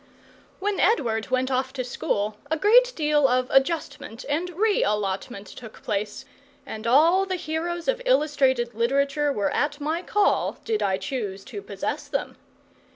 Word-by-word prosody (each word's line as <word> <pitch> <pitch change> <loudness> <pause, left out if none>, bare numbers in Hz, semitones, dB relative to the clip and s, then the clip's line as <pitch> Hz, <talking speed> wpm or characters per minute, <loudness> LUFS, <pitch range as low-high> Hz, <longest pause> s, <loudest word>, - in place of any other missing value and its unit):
When 405 0 -1
Edward 235 - +1
went 255 +1 0
off 260 0 -1
to 260 -2 -3
school 210 -3 -2
a 320 - 0
great 485 +8 +5
deal 300 -3 +3
of 255 0 0
adjustment 270 -5 0
and 320 +5 -1
re 405 +4 +1
allotment 200 +1 -2
took 220 +3 -12
place, 210 +5 -3 0.4
and 220 -3 -6
all 335 +10 +5
the 375 - -1
heroes 340 +1 -3
of - - +1
illustrated 280 - +2
literature 280 +5 +1
were 205 -7 -1
at 290 0 -1
my 310 +4 -1
call, 415 +2 +1
did 445 -2 0
I 190 -1 +1
choose 195 -2 -4
to 405 - -7
possess - - -4
them. - - -3
280 Hz, 155 wpm, -25 LUFS, 235-345 Hz, 0.4 s, great